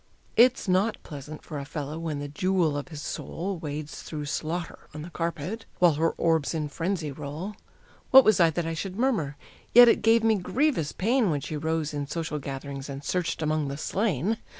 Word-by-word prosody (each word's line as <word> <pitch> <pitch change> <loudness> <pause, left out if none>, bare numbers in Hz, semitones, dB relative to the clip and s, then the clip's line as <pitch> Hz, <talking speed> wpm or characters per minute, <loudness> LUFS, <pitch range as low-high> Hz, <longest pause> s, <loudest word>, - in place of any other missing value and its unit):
It's 245 -1 +5
not 190 +4 +2
pleasant 150 0 -9
for 150 -3 -6
a - - -5
fellow 150 +1 -5
when 160 -3 -3
the 145 0 -4
jewel 170 +1 +1
of 145 +2 -4
his 155 -4 -8
soul 185 +1 -4
Wades 150 0 -5
through 150 -2 -5
slaughter 165 +3 -4
on 150 - -6
the 170 - -9
carpet, 170 +6 -4
while 175 -3 +5
her 160 +3 +1
orbs 165 -1 +1
in 150 -2 -2
frenzy 165 -1 -2
roll: 155 +8 -6 0.5
What 265 0 +9
was 215 -3 +5
I 170 -2 +6
that 165 +1 -2
I 165 - -2
should 185 +3 -4
murmur? 205 - 0 0.4
Yet 245 0 +11
it 230 - +4
gave 225 +1 +4
me 220 -1 +4
grievous 245 - 0
pain 230 +2 +2
When 150 -3 0
she 155 - -5
rose 155 0 -1
in 145 -1 -3
social 160 0 -3
gatherings 140 0 -6
and 140 +1 -6
searched 175 0 -1
among 155 -1 0
the 140 0 -4
slain. 200 - 0
160 Hz, 195 wpm, -27 LUFS, 145-190 Hz, 0.5 s, Yet